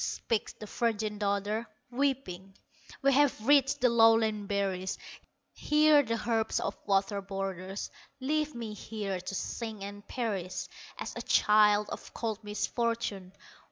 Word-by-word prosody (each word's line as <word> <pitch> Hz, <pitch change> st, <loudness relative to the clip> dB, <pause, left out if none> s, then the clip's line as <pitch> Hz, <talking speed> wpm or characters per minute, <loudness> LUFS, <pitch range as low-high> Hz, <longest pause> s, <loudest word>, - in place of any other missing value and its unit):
Speaks 225 Hz, -3 st, -2 dB
the 215 Hz, -, -10 dB
virgin 215 Hz, -1 st, -1 dB
daughter, 205 Hz, +2 st, -1 dB, 0.2 s
weeping: 240 Hz, -9 st, -2 dB, 0.5 s
"We 275 Hz, 0 st, +5 dB
have 275 Hz, -5 st, +3 dB
reached 275 Hz, -1 st, +4 dB
the 250 Hz, -, +5 dB
lowland 225 Hz, -2 st, +4 dB
berries, 195 Hz, -2 st, -1 dB, 0.6 s
Here 300 Hz, 0 st, +5 dB
the 230 Hz, -4 st, -3 dB
herbs 225 Hz, -2 st, +1 dB
of -, -, -2 dB
water 200 Hz, 0 st, +1 dB
borders; 195 Hz, 0 st, -5 dB, 0.3 s
Leave 300 Hz, +2 st, -1 dB
me 230 Hz, -3 st, -5 dB
here 205 Hz, -3 st, -4 dB
to 190 Hz, +2 st, -5 dB
sink 220 Hz, 0 st, -4 dB
and 205 Hz, +1 st, -8 dB
perish 195 Hz, -7 st, -3 dB, 0.3 s
As -, -, -6 dB
a -, -, -4 dB
child 210 Hz, 0 st, +4 dB
of -, -, -8 dB
cold 220 Hz, -2 st, -3 dB
misfortune. 210 Hz, -2 st, -2 dB
215 Hz, 130 wpm, -30 LUFS, 200-235 Hz, 0.6 s, We